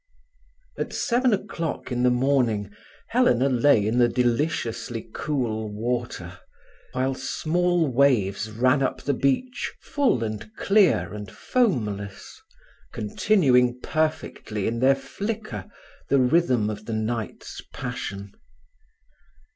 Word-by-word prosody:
At - - -3
seven 250 +1 +2
o'clock 190 -9 -3
in 125 0 0
the 125 - +4
morning 125 -5 +1 0.4
Helena 140 - +3
lay 125 -4 +4
in 115 +3 +1
the 120 -1 +5
deliciously 120 -2 -1
cool 115 -7 -2
water, 110 -5 -4 0.5
while 130 +1 0
small 175 +4 0
waves 120 -7 +2
ran 125 +5 +2
up 130 -1 -1
the 145 - +1
beach 140 - 0
full 265 - +1
and 110 -1 -5
clear 200 - +3
and 105 -2 -7
foamless, 105 - -2 0.5
continuing 125 - +2
perfectly 155 -9 -2
in 115 +1 -1
their 135 +2 +5
flicker 205 +12 -5 0.4
the 140 - +4
rhythm 125 -5 +3
of 105 0 -8
the 115 - -4
night's 110 -1 -4
passion. 100 -5 -5
125 Hz, 110 wpm, -25 LUFS, 110-155 Hz, 0.5 s, the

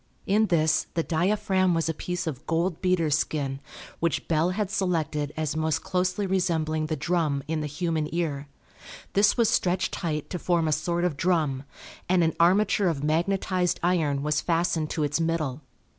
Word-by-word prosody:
In 215 +2 +3
this 160 -3 +2
the 165 - +1
diaphragm 185 +1 +1
was 165 0 0
a 165 - 0
piece 180 +3 -4
of 145 -4 -5
gold 165 +1 0
beater's 170 -5 +2
skin, 135 -4 -2 0.4
which 170 -3 -1
Bell 165 +1 +2
had 200 +1 -2
selected 160 -7 -1
as 155 -1 -1
most 160 0 0
closely 185 +2 0
resembling 160 -5 0
the 155 - -1
drum 155 -5 0
in 160 0 -1
the 150 - -2
human 155 0 -2
ear. 150 -4 -2 0.7
This 205 +3 +4
was 235 -2 +4
stretched 180 -1 +1
tight 155 -3 -3
to 180 - -3
form 170 -2 +1
a - - +1
sort 170 +3 0
of 175 -6 0
drum, 150 -6 0 0.4
and 180 -1 +4
an 160 -1 +1
armature 195 +3 +3
of 150 -5 -1
magnetized 180 +3 0
iron 155 -6 +1
was 150 0 +1
fastened 165 -2 0
to 155 - -1
its 145 +2 0
middle. 155 -4 -1
165 Hz, 175 wpm, -26 LUFS, 155-180 Hz, 0.7 s, This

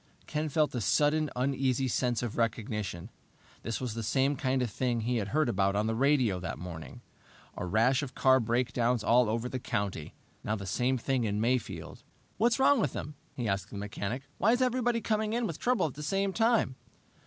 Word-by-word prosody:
Ken 155 0 -2
felt 150 +1 +1
a 120 - -2
sudden, 150 +7 +2
uneasy 130 0 0
sense 125 -1 0
of 115 -3 -3
recognition. 105 -4 -2 0.5
This 115 -1 -3
was 125 -4 -3
the 115 - -4
same 135 +6 +1
kind 130 -1 0
of 120 - -3
thing 120 0 -1
he 120 +2 0
had 105 -2 -2
heard 155 +6 +1
about 100 -3 +1
on 105 +1 +1
the 110 - 0
radio 125 -6 +2
that 90 - -5
morning! 80 -1 -8 0.5
A 90 - -4
rash 115 +8 +3
of 130 -3 -6
car 130 0 +5
breakdowns 120 0 0
all 120 -1 +4
over 115 +2 -1
the 130 +1 -4
country. 100 -9 -3 0.3
Now, 105 - -1
the 100 -2 -6
same 125 +6 +1
thing 130 +1 0
in 105 -1 -1
Mayfield! 120 +2 -2 0.4
"What's 235 +3 +3
wrong 270 -1 +4
with 145 - 0
them?" 150 - -5 0.2
he 120 -3 -2
asked 100 0 -1
the 100 - -8
mechanic. 105 +5 -4 0.2
"Why 220 +5 +4
is 245 - +1
everybody 245 -2 +1
coming 215 0 0
in 240 0 0
with 165 -7 -4
trouble 250 -5 +2
at 150 - -3
the 150 - -9
same 195 +5 0
time?" 225 - +2
125 Hz, 200 wpm, -30 LUFS, 110-150 Hz, 0.5 s, car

